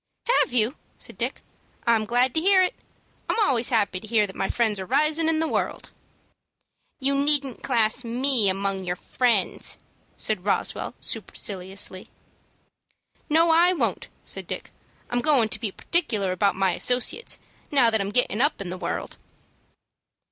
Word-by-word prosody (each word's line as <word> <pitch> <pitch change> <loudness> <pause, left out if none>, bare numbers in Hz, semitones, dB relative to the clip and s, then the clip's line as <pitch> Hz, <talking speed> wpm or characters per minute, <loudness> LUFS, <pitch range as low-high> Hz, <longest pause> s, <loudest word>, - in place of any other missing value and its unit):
"Have - - 0
you?" 240 +2 +1 0.2
said - - -4
Dick. - - -4 0.4
"I'm 225 -2 +2
glad 245 +2 +2
to 320 - +1
hear 380 +1 +5
it. 365 - 0 0.6
I'm - - +1
always 250 - +2
happy 205 -6 +1
to 220 - -12
hear 215 -1 +2
that 195 - -10
my 195 - -2
friends 220 -4 0
are 190 - -5
risin' 310 - +2
in 320 -1 +1
the 320 - 0
world." - - -3 1.1
"You 275 0 +1
needn't 280 -2 +1
class 225 +2 +1
me 240 -2 +3
among 195 0 -1
your 180 -1 -2
friends," 235 +1 0 0.4
said 215 -5 +1
Roswell, 200 - -1
superciliously. 190 -1 -2 1.2
"No, 325 +2 +4
I 345 +3 +5
won't," 355 - -2 0.2
said - - -1
Dick. - - -6 0.4
"I'm 245 0 0
goin' 245 -5 +3
to 215 - -1
be 215 -3 -2
particular 215 - -1
about 195 +2 +1
my 190 -1 +1
associates, 250 - +1 0.3
now 255 -5 +4
that 220 -2 +1
I'm 200 - -2
gettin' 230 0 +1
up 290 +3 +1
in 190 -3 -5
the 185 - -6
world." - - -4
235 Hz, 155 wpm, -24 LUFS, 200-280 Hz, 1.2 s, hear